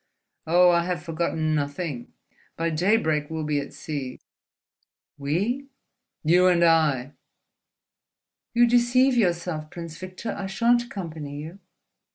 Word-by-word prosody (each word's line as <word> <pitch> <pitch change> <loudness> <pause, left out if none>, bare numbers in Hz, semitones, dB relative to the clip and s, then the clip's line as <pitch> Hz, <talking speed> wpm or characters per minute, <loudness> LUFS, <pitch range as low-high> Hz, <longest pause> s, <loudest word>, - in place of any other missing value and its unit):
Oh, 175 +2 +6
I 170 0 +3
have 175 -4 -3
forgotten 160 -1 -1
nothing! 145 -2 -3 0.5
By 165 0 0
daybreak 160 -4 +1
we'll 160 -1 -3
be 150 -1 0
at 140 - -6
sea." 140 -5 -6 1.0
"We?" 205 - -1 0.6
"You 175 +4 +5
and 175 -2 +4
I." 150 -5 +3 1.4
"You 240 0 +6
deceive 245 +2 +4
yourself, 170 -7 0
Prince 165 -1 -8
Victor. 185 +5 -6
I 200 -1 -5
shan't 235 +5 +2
accompany 160 -9 -7
you." 170 +5 -10
170 Hz, 120 wpm, -25 LUFS, 155-190 Hz, 1.4 s, Oh